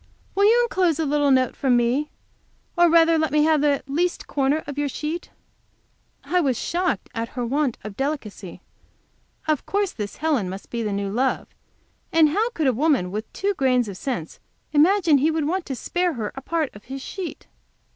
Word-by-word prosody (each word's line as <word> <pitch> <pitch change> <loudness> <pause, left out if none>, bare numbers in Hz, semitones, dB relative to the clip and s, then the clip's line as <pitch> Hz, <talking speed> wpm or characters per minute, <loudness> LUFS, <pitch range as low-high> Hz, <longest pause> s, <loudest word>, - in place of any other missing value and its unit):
Will 400 +1 +3
you 470 +3 +5
enclose 370 -9 +1
a 320 - 0
little 290 0 +2
note 260 -2 +3
from 255 -3 +2
me? 250 +6 +1 0.7
Or 345 -1 +5
rather 330 0 +5
let 315 - 0
me 300 0 +3
have 310 -1 +3
the 290 -1 +2
least 340 +6 -1
corner 285 +2 0
of 285 - -6
your 290 0 -1
sheet?" 310 +5 -4 0.9
I 360 - +1
was 265 -7 +1
shocked 350 - -1
at 230 0 -3
her 245 - -1
want 275 0 0
of 210 -1 -7
delicacy. 230 - -4 0.8
Of 310 -3 0
course 405 -1 0
this 205 -2 -6
Helen 290 -12 0
must 190 +1 -8
be 235 - -2
the 215 -2 -2
new 200 0 -2
love, 255 +5 0 0.6
and 320 -2 +5
how 430 +9 +1
could 325 -10 -2
a 260 - +3
woman 260 - +1
with 215 +3 -5
two 400 +1 -1
grains 255 - +2
of 200 - -6
sense 205 - -4 0.3
imagine 330 0 +4
he 300 +4 +3
would 320 -2 0
want 360 +2 -2
to 270 - -3
spare 355 +6 -1
her 220 -5 -4
a 270 - -8
part 320 0 -2
of 205 - -14
his 270 +1 -7
sheet! 375 -4 -6
290 Hz, 195 wpm, -23 LUFS, 245-330 Hz, 0.9 s, you